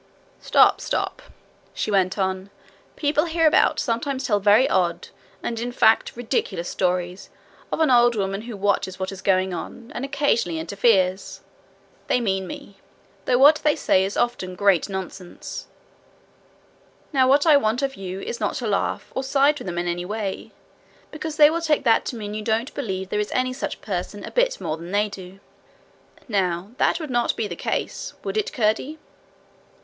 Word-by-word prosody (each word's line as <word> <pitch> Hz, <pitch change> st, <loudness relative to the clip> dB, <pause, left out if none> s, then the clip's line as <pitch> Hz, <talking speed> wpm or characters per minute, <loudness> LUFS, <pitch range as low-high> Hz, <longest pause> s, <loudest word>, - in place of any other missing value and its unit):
'Stop, -, -, +4 dB
stop,' -, -, -2 dB, 0.5 s
she -, -, -2 dB
went 190 Hz, -1 st, +2 dB
on. 190 Hz, 0 st, -2 dB, 0.5 s
'People 300 Hz, +1 st, +1 dB
hereabout 325 Hz, -1 st, +3 dB
sometimes 260 Hz, +2 st, -2 dB
tell 205 Hz, -3 st, +2 dB
very 205 Hz, +6 st, +5 dB
odd 175 Hz, -2 st, 0 dB, 0.3 s
and 230 Hz, -1 st, -3 dB
in 240 Hz, +1 st, -3 dB
fact 225 Hz, -2 st, +3 dB
ridiculous 220 Hz, -7 st, -2 dB
stories 180 Hz, 0 st, -2 dB, 0.4 s
of -, -, -2 dB
an 315 Hz, -4 st, +3 dB
old 240 Hz, -1 st, +5 dB
woman 195 Hz, -1 st, -2 dB
who 230 Hz, -2 st, -8 dB
watches 195 Hz, -2 st, 0 dB
what 190 Hz, 0 st, -3 dB
is 190 Hz, -1 st, -9 dB
going 185 Hz, -1 st, +1 dB
on, 235 Hz, +6 st, -7 dB
and 245 Hz, -, -5 dB
occasionally 275 Hz, -, 0 dB
interferes. 190 Hz, +2 st, +1 dB, 0.7 s
They -, -, +2 dB
mean 190 Hz, -5 st, -1 dB
me, 195 Hz, +2 st, -9 dB, 0.5 s
though 250 Hz, -, +3 dB
what 290 Hz, +4 st, +7 dB
they 300 Hz, -1 st, +1 dB
say 190 Hz, -, +2 dB
is 195 Hz, +1 st, -3 dB
often 190 Hz, -7 st, -1 dB
great 200 Hz, -2 st, +2 dB
nonsense. 190 Hz, -1 st, -7 dB, 1.5 s
Now 260 Hz, -2 st, +4 dB
what 280 Hz, +3 st, +4 dB
I 310 Hz, -3 st, +7 dB
want 245 Hz, -1 st, +1 dB
of 275 Hz, -1 st, -1 dB
you 190 Hz, -2 st, -6 dB
is 235 Hz, -, -5 dB
not -, -, -1 dB
to 245 Hz, -, -4 dB
laugh, 205 Hz, -2 st, -1 dB
or 265 Hz, -, -2 dB
side 280 Hz, +2 st, +2 dB
with -, -, -8 dB
them 175 Hz, -1 st, -4 dB
in 175 Hz, 0 st, -1 dB
any 175 Hz, 0 st, -2 dB
way; 205 Hz, 0 st, -4 dB, 0.6 s
because 310 Hz, 0 st, -5 dB
they 300 Hz, 0 st, +7 dB
will 335 Hz, +1 st, -1 dB
take 310 Hz, -3 st, +1 dB
that 230 Hz, -3 st, +3 dB
to -, -, -4 dB
mean 210 Hz, -2 st, -6 dB
that 210 Hz, -, -4 dB
you -, -, -6 dB
don't 225 Hz, +4 st, -1 dB
believe 190 Hz, -7 st, -4 dB
there 210 Hz, -, -1 dB
is 210 Hz, -, -1 dB
any 255 Hz, 0 st, +1 dB
such 265 Hz, -, -5 dB
person 200 Hz, +1 st, -4 dB
a -, -, -7 dB
bit -, -, +1 dB
more 155 Hz, -, -3 dB
than 170 Hz, +2 st, -9 dB
they 205 Hz, +1 st, +1 dB
do. 190 Hz, -1 st, -10 dB, 0.9 s
Now 190 Hz, -3 st, -1 dB
that -, -, +2 dB
would 310 Hz, -5 st, -6 dB
not 240 Hz, -1 st, +1 dB
be 215 Hz, -, -2 dB
the 175 Hz, -, -6 dB
case -, -, -3 dB
would -, -, -4 dB
it, 430 Hz, -1 st, -1 dB
Curdie?' 235 Hz, +7 st, 0 dB
215 Hz, 180 wpm, -23 LUFS, 190-265 Hz, 1.5 s, what